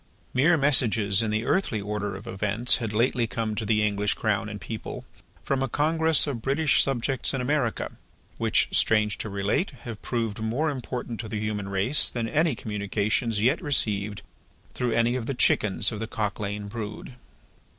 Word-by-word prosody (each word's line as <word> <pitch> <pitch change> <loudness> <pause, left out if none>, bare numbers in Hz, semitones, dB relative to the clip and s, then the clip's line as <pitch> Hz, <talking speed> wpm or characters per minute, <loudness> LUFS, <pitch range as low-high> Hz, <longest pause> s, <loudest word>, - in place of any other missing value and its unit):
Mere 155 +6 +4
messages 115 -8 +5
in 110 - -1
the 110 +2 -1
earthly 155 - 0
order 105 -1 -3
of 100 +3 -9
events 110 +2 +2
had 110 -3 -4
lately 115 +2 +1
come 110 -1 -3
to 110 0 -4
the 105 -1 +2
English 105 0 0
Crown 105 -1 -1
and 105 -1 -7
People, 105 +4 -7 0.4
from 135 -1 -1
a 135 - -1
congress 160 +3 +3
of 135 -6 -4
British 140 +4 +2
subjects 135 0 0
in - - -2
America: 125 -2 -1 0.5
which, - - +2
strange 105 -1 +2
to 105 - -4
relate, 100 - 0
have 115 -3 -7
proved 115 -3 -3
more 125 +8 -1
important 125 -3 -5
to 110 - -5
the 105 - -3
human 105 -2 -3
race 100 +9 +2
than 115 -2 -3
any 155 +3 +1
communications 105 +2 -1
yet 125 +4 +2
received 105 -7 0 0.5
through 125 -1 -1
any 115 +1 +2
of 120 -3 -4
the 140 - -2
chickens 105 -4 +2
of 105 - -5
the 110 - -4
Cock 105 -3 -3
lane 105 0 -4
brood. 105 +3 -7
110 Hz, 175 wpm, -26 LUFS, 105-130 Hz, 0.5 s, messages